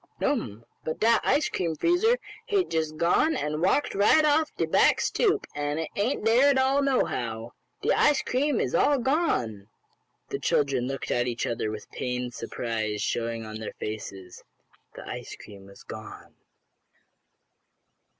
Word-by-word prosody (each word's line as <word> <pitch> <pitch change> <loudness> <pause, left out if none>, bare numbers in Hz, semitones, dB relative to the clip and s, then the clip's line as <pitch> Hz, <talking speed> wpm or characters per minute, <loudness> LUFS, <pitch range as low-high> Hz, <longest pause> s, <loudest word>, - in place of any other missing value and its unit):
"No'm, 115 - -2 0.2
but 155 - -4
dat 230 +1 +4
ice 290 +3 +2
cream 170 -3 -2
freezer 355 - +3 0.3
hate 395 -3 +1
jest 155 -1 -1
gone 175 - +3
and 150 +1 -2
walked 195 +11 +2
right 210 +10 +4
off 305 +1 +3
de - - 0
back - - +4
stoop, 415 -2 +1
an' 145 0 -2
it 160 -1 -3
ain't 215 +3 -1
dere 240 +5 +5
at 275 - +3
all, 265 +2 +3
nohow! 120 - -1 0.3
De - - +2
ice 295 -2 +3
cream 280 +4 0
is - - -1
all 290 - +4
gone!" 235 - 0 0.6
The - - -3
children 135 -4 +1
looked 135 0 -4
at 120 0 +1
one 120 - -2
another 115 -2 -2
with 105 -1 -8
pained 125 -1 -3
surprise 110 -3 -3
showing 115 -1 -2
on 110 0 -7
their 110 - -6
faces. 100 -4 -7 0.5
The - - -10
ice - - -6
cream 100 -2 -13
was 100 - -15
gone! - - -10
155 Hz, 155 wpm, -27 LUFS, -, 0.6 s, dere